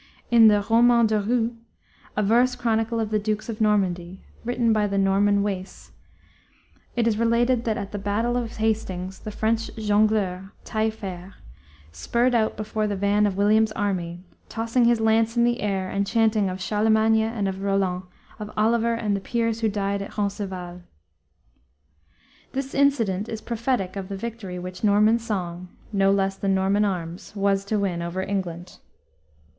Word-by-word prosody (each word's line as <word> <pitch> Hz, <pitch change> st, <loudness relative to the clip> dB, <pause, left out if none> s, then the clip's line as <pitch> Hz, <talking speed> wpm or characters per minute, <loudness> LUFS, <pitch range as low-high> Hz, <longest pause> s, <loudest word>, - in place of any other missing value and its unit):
In 230 Hz, -2 st, +8 dB
the 205 Hz, -1 st, +4 dB
Roman 235 Hz, +1 st, +5 dB
de 215 Hz, -1 st, +1 dB
Rou, 230 Hz, +2 st, 0 dB, 0.6 s
a 210 Hz, -, +2 dB
verse 245 Hz, +5 st, +3 dB
chronicle 230 Hz, -1 st, 0 dB
of 220 Hz, -1 st, -2 dB
the 215 Hz, -, +2 dB
dukes 215 Hz, +2 st, -3 dB
of 220 Hz, -1 st, -5 dB
Normandy, 190 Hz, -4 st, 0 dB, 0.2 s
written 235 Hz, -1 st, +1 dB
by 210 Hz, -1 st, +2 dB
the 200 Hz, 0 st, -2 dB
Norman 200 Hz, +1 st, +3 dB
Wace, 195 Hz, -2 st, -5 dB, 1.0 s
it 235 Hz, -1 st, +1 dB
is 220 Hz, -1 st, +1 dB
related 235 Hz, +1 st, +2 dB
that 220 Hz, -2 st, 0 dB
at 200 Hz, -1 st, -5 dB
the 205 Hz, -, -4 dB
battle 210 Hz, +5 st, -1 dB
of 235 Hz, -2 st, -3 dB
Hastings 190 Hz, -4 st, -2 dB
the -, -, -7 dB
French 225 Hz, +2 st, -1 dB
jongleur, 205 Hz, -3 st, +1 dB
Taillefer, 200 Hz, -4 st, -3 dB, 0.6 s
spurred 235 Hz, -, 0 dB
out 220 Hz, -2 st, +1 dB
before 215 Hz, 0 st, -2 dB
the 205 Hz, -, -2 dB
van 205 Hz, +2 st, +2 dB
of 195 Hz, -2 st, -3 dB
William's 215 Hz, +2 st, +3 dB
army, 180 Hz, -5 st, -3 dB, 0.3 s
tossing 230 Hz, +2 st, +1 dB
his 235 Hz, -1 st, +3 dB
lance 225 Hz, +1 st, +2 dB
in 235 Hz, -, +4 dB
the 240 Hz, +1 st, +1 dB
air 195 Hz, -2 st, -1 dB
and 200 Hz, +1 st, -1 dB
chanting 220 Hz, -3 st, +2 dB
of 185 Hz, 0 st, -5 dB
"Charlemagne 220 Hz, +3 st, +2 dB
and 220 Hz, -2 st, -1 dB
of 190 Hz, 0 st, -4 dB
Roland, 195 Hz, -2 st, 0 dB, 0.4 s
of 210 Hz, -1 st, -6 dB
Oliver 230 Hz, +2 st, +2 dB
and 215 Hz, -3 st, -1 dB
the -, -, -1 dB
peers 230 Hz, +1 st, -1 dB
who 220 Hz, -, +2 dB
died 200 Hz, -1 st, -2 dB
at 200 Hz, -, -8 dB
Roncesvals." 190 Hz, -4 st, -4 dB, 1.7 s
This 270 Hz, 0 st, -4 dB
incident 230 Hz, -8 st, +1 dB
is 220 Hz, -, -4 dB
prophetic 230 Hz, -5 st, -2 dB
of 195 Hz, -1 st, -5 dB
the 195 Hz, -, -4 dB
victory 210 Hz, -4 st, -6 dB
which 180 Hz, +2 st, -8 dB
Norman 210 Hz, +2 st, +4 dB
song, 185 Hz, -6 st, -4 dB, 0.2 s
no 195 Hz, -1 st, +3 dB
less 195 Hz, -1 st, +1 dB
than 195 Hz, -1 st, 0 dB
Norman 195 Hz, +2 st, +2 dB
arms, 180 Hz, 0 st, -4 dB
was 195 Hz, -1 st, +1 dB
to 215 Hz, +1 st, -1 dB
win 190 Hz, -4 st, -1 dB
over 170 Hz, +2 st, -3 dB
England. 180 Hz, -3 st, -4 dB
210 Hz, 165 wpm, -24 LUFS, 195-225 Hz, 1.7 s, In